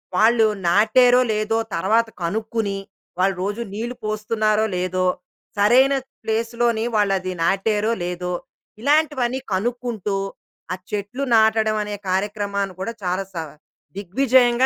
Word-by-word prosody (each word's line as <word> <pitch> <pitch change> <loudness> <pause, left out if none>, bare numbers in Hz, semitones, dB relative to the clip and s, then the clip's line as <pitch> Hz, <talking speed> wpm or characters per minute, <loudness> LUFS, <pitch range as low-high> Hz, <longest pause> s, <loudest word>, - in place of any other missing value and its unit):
వాళ్ళు 225 +3 +5 0.2
నాటేరో, 245 +7 +5
లేదో, 215 +1 0 0.2
తరవాత 220 +6 +2 0.2
కనుక్కుని, 215 +2 -2 0.4
వాళ్ళు 190 0 +2
రోజూ 205 +4 -2
నీళ్ళు 235 +4 -4
పోస్తున్నారో 215 0 +1
లేదో, 185 0 0 0.5
సరైన 250 +7 +5 0.3
ప్లేస్‌ 230 +1 -1
లోని 230 -1 +2
వాళ్ళది 195 -3 +1
నాటేరో 210 +4 +1
లేదో, 180 0 -3 0.5
ఇలాంటివన్నీ 280 -3 +2
కనుక్కుంటూ, 225 -1 -2 0.6
ఆ - - -1 0.2
చెట్లు 210 +6 -3
నాటడం 220 0 +3
అనే 210 0 -4
కార్యక్రమాన్ని 200 0 -1
కూడా 230 +5 -3
చాలా 185 +2 -1
సవ 165 -3 -4 0.5
దిగ్విజయంగా 245 +5 +3
215 Hz, 110 wpm, -22 LUFS, 195-235 Hz, 0.6 s, వాళ్ళు